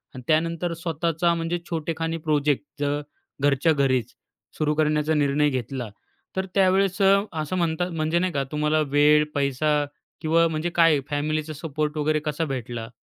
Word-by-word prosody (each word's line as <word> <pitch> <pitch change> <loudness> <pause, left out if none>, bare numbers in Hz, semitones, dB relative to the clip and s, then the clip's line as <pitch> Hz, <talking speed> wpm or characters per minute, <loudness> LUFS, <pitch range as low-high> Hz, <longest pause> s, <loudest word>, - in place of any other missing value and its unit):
आणि 130 - -7
त्यानंतर 165 +2 +1
स्वतःचा 165 0 0
म्हणजे 165 +1 -1
छोटेखानी 165 0 -2
प्रोजेक्ट 150 -2 0 0.2
जर 145 0 0 0.4
घरच्या 145 +3 +3
घरीच 130 -4 +1 0.4
सुरू 150 -1 +1
करण्याचा 155 0 +1
निर्णय 145 0 +2
घेतला. 125 -2 -4 0.5
तर 190 0 -1
त्यावेळेस 195 0 +3
अ, 195 0 +6 0.3
असं 155 +5 -3
म्हणता 170 +1 0
म्हणजे 165 +1 0
नाही 185 -2 -1
का 140 -1 0
तुम्हाला 150 +1 +1
वेळ, 150 +2 +4
पैसा 145 +2 +1 0.4
किंवा 165 +1 +3
म्हणजे 160 +1 -2
काय 165 -4 +5
फॅमिलीचा 155 +1 -2
सपोर्ट 150 0 -3
वगैरे 155 +1 +1
कसा 150 +2 -1
भेटला? 120 -4 -5
155 Hz, 145 wpm, -24 LUFS, 145-165 Hz, 0.5 s, अ